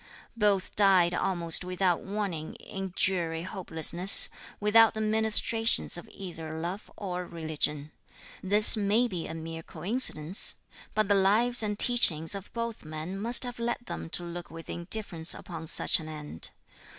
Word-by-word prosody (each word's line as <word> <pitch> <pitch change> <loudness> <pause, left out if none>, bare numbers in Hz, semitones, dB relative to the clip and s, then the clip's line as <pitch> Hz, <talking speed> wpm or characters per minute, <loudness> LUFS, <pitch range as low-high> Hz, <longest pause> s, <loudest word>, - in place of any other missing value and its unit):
Both 205 -4 -1
died 190 -4 +3
almost 175 -2 +3
without 180 -1 -1
warning 195 -6 -5
in 195 -1 -8
dreary 170 -3 -1
hopelessness, 180 -1 +5 0.3
without 220 +2 +4
the - - -4
ministrations 220 +1 +1
of 175 - -6
either 165 -4 -9
love 175 +5 -6
or 180 -3 -6
religion. 155 -2 -4 0.5
This 205 +4 +5
may 215 +3 +1
be 180 -7 -6
a 160 - -7
mere 165 0 -8
coincidence, 175 -1 -1 0.4
but 215 -1 0
the 205 - +2
lives 215 +6 +2
and 210 -1 -3
teachings 165 -11 +4
of 200 0 -6
both 230 -1 -6
men 155 +4 -7
must 230 +6 +2
have 245 -1 -7
led 240 +1 -4
them 80 0 -8
to 175 - -9
look 175 0 -8
with 165 0 -10
indifference 170 -2 +2
upon 165 -2 -9
such - - +1
an 155 -1 -9
end. 150 - -7
185 Hz, 150 wpm, -27 LUFS, 165-210 Hz, 0.5 s, hopelessness